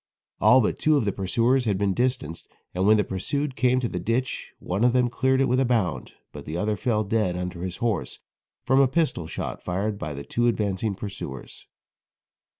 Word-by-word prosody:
All 130 Hz, +1 st, +6 dB
but 105 Hz, -, -1 dB
two 155 Hz, -1 st, +3 dB
of 120 Hz, -, 0 dB
the 100 Hz, -, +1 dB
pursuers 115 Hz, +7 st, +1 dB
had 100 Hz, -4 st, +1 dB
been 100 Hz, -1 st, +1 dB
distanced, 120 Hz, -, -2 dB, 0.3 s
and 95 Hz, +2 st, +1 dB
when 110 Hz, +1 st, +6 dB
the 105 Hz, -, +2 dB
pursued 140 Hz, +10 st, -3 dB
came 125 Hz, +2 st, +2 dB
to 120 Hz, -, 0 dB
the 90 Hz, -, -4 dB
ditch 115 Hz, +8 st, -2 dB
one 95 Hz, +5 st, -2 dB
of 125 Hz, 0 st, +4 dB
them 125 Hz, -1 st, +2 dB
cleared 130 Hz, +1 st, +1 dB
it -, -, +4 dB
with 125 Hz, +1 st, +2 dB
a -, -, +4 dB
bound, 110 Hz, -, -1 dB, 0.2 s
but -, -, -10 dB
the 80 Hz, +2 st, -4 dB
other 105 Hz, +3 st, 0 dB
fell 110 Hz, 0 st, 0 dB
dead 105 Hz, -4 st, 0 dB
under 90 Hz, -1 st, -5 dB
his 90 Hz, 0 st, -4 dB
horse 115 Hz, -4 st, -2 dB, 0.5 s
from 130 Hz, +1 st, +4 dB
a 135 Hz, -, +6 dB
pistol 135 Hz, -, 0 dB
shot -, -, -5 dB
fired 100 Hz, +3 st, -2 dB
by 75 Hz, -1 st, -4 dB
the 70 Hz, -, -6 dB
two 120 Hz, +9 st, 0 dB
advanced 105 Hz, -5 st, -1 dB
pursuers. 95 Hz, -, -7 dB
110 Hz, 205 wpm, -25 LUFS, 95-125 Hz, 0.5 s, All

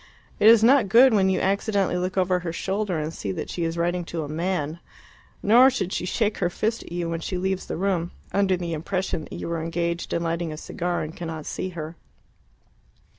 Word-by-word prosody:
It 210 Hz, -, +5 dB
is 225 Hz, -1 st, +8 dB
not 245 Hz, -3 st, +5 dB
good, 245 Hz, +4 st, +7 dB
when 195 Hz, -3 st, +4 dB
you 190 Hz, -, +1 dB
accidentally 200 Hz, -1 st, +1 dB
look 185 Hz, +1 st, -2 dB
over 185 Hz, -1 st, +2 dB
her 175 Hz, -2 st, -4 dB
shoulder, 190 Hz, 0 st, -2 dB
to 155 Hz, -, -3 dB
see 100 Hz, -11 st, -4 dB
that -, -, -5 dB
she 170 Hz, -, -3 dB
is 165 Hz, 0 st, -2 dB
writing 175 Hz, +1 st, 0 dB
to 165 Hz, -1 st, -4 dB
a -, -, -5 dB
man. 160 Hz, 0 st, -2 dB, 0.6 s
Nor 240 Hz, +6 st, +7 dB
should 200 Hz, -8 st, -2 dB
she -, -, -2 dB
shake 215 Hz, +2 st, 0 dB
her 175 Hz, -, +1 dB
fist 220 Hz, +5 st, -1 dB
at -, -, -12 dB
you 175 Hz, -1 st, -2 dB
when 165 Hz, 0 st, -2 dB
she 180 Hz, +3 st, -3 dB
leaves 190 Hz, +1 st, -2 dB
the -, -, -3 dB
room, 180 Hz, -2 st, 0 dB, 0.2 s
under 195 Hz, -2 st, +2 dB
the 170 Hz, -1 st, -4 dB
impression 170 Hz, +1 st, -2 dB
that -, -, -12 dB
you -, -, -5 dB
are 165 Hz, -1 st, -1 dB
engaged 170 Hz, +1 st, -2 dB
in 170 Hz, -, 0 dB
lighting 165 Hz, 0 st, -2 dB
a 155 Hz, -, -6 dB
cigar 175 Hz, +2 st, -3 dB
and 155 Hz, +1 st, -7 dB
cannot 160 Hz, -3 st, -6 dB
see 185 Hz, -, -4 dB
her. 160 Hz, +1 st, -6 dB
180 Hz, 220 wpm, -25 LUFS, 165-195 Hz, 0.6 s, is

